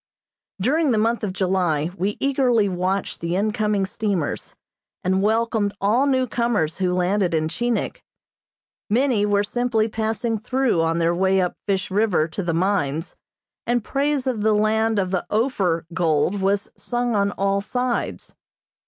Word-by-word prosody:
During 295 - +2
the 230 - +2
month 230 +2 +1
of 205 - -1
July 180 -5 0
we 200 +2 -2
eagerly 255 -6 +2
watched 185 +1 -2
the 170 +1 -1
incoming 210 0 0
steamers, 200 -6 -3 0.5
and 190 +1 +1
welcomed 220 -1 +1
all 230 +8 +2
new 260 -2 +2
comers 230 -11 -1
who 185 -1 +1
landed 180 0 +1
in 155 0 +1
Chinik. 240 +8 -2 0.9
Many 230 -2 +2
were 205 0 +2
simply 225 0 0
passing 225 +1 -2
through 245 -5 +1
on 165 0 +1
their 170 0 +2
way 190 +2 +2
up 180 -1 0
Fish 195 -1 -1
River 195 -6 +2
to 160 - -4
the 175 -2 -1
mines, 165 -3 -1 0.5
and 240 -1 +1
praise 280 +1 0
of 250 -5 -1
the 215 +1 +3
land 220 +1 +2
of 185 -2 0
the 185 - 0
"Ophir" 200 -8 0
gold 165 +3 +1
was 200 +1 0
sung 240 -1 -2
on 200 -1 +2
all 195 0 0
sides. 245 +3 -3
205 Hz, 155 wpm, -22 LUFS, 185-230 Hz, 0.9 s, the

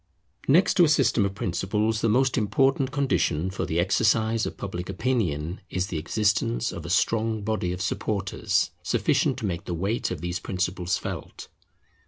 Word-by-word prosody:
Next 175 +7 +5
to 180 - +7
a 160 - +5
system 125 -8 +3
of 100 0 -3
principles, 105 +4 -1
the 115 - +2
most 130 +4 +3
important 130 +4 +2
condition 95 - 0
for 100 - -3
the 80 - 0
exercise 110 +5 +2
of - - -7
Public 90 -2 -5
Opinion 95 - -1
is 90 0 -1
the 80 - -2
existence 110 +6 0
of - - -7
a - - -6
strong 110 -1 +1
body 105 -4 -1
of 90 +1 -3
supporters 100 0 -1
sufficient - - +1
to - - -4
make 85 -3 -3
the 85 - -3
weight 100 +7 -1
of 85 -4 -5
these 90 +2 -3
principles 90 -1 -1
felt. - - -7
100 Hz, 170 wpm, -26 LUFS, 90-115 Hz, -, to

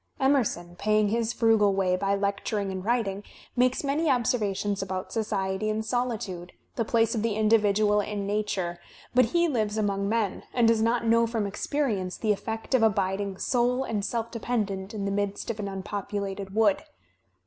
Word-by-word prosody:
Emerson, 235 -11 +1
paying 215 0 +2
his 230 +1 0
frugal 220 -4 +3
way 185 -2 +2
by 195 +2 0
lecturing 200 0 -1
and 190 -1 -5
writing, 210 -3 0 0.3
makes 255 +2 +2
many 290 +3 +1
observations 210 -6 0
about 185 -1 -4
society 205 -2 -1
and 215 +1 -1
solitude, 215 -7 -3 0.2
the 230 - +1
place 225 0 +2
of 225 - -1
the 225 -2 0
individual 210 -1 +3
in 205 0 -4
nature, 200 -4 -2 0.3
but 255 +1 +5
he 340 +9 +2
lives 220 -7 -1
among 200 -2 0
men 220 -3 0
and 240 -2 +4
does 225 -1 +3
not 230 +1 +1
know 230 0 +4
from 225 -2 -1
experience 200 -3 -2
the 215 - +1
effect 220 +4 -3
of 260 - +4
abiding 195 -2 +1
sole 250 +3 +1
and 215 -5 -2
self 230 +1 -2
dependent 210 -5 -2
in 200 -2 -3
the 200 - -1
midst 205 +2 -2
of 220 - -8
an 205 - -3
unpopulated 195 0 -4
wood. 215 -3 +3
210 Hz, 170 wpm, -27 LUFS, 195-230 Hz, 0.3 s, but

